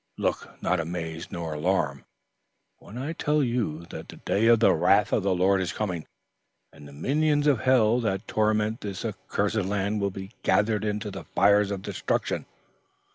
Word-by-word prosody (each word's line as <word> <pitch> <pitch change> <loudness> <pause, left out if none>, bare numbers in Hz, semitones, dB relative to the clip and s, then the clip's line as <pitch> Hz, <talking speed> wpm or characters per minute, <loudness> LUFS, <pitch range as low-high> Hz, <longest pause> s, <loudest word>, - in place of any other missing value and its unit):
Look - - -3
not 90 - +1
amazed 85 0 -5
nor 85 -3 -4
alarmed 75 -4 -1 0.7
when 110 - -11
I 140 +6 -3
tell 150 -2 +1
you 110 - -2
that - - -8
the - - -9
day 110 +3 0
of 115 -1 +6
the 115 - +5
wrath 100 +5 +3
of - - +3
the 95 -1 +1
Lord 95 +2 +3
is 95 - -2
coming, 90 -7 -3 0.7
and 75 - -13
the - - -12
minions 145 - +1
of 140 -6 +4
hell 120 -2 +4
that 105 -3 -2
torment 110 +1 +1
this 100 +1 -5
accursed 105 0 -2
land 100 +1 -1
will 100 - +1
be 95 +1 -8
gathered 105 0 +2
into 105 0 -2
the - - -8
fires 100 0 +3
of 100 -2 -4
destruction. - - -2
100 Hz, 175 wpm, -26 LUFS, 90-110 Hz, 0.7 s, of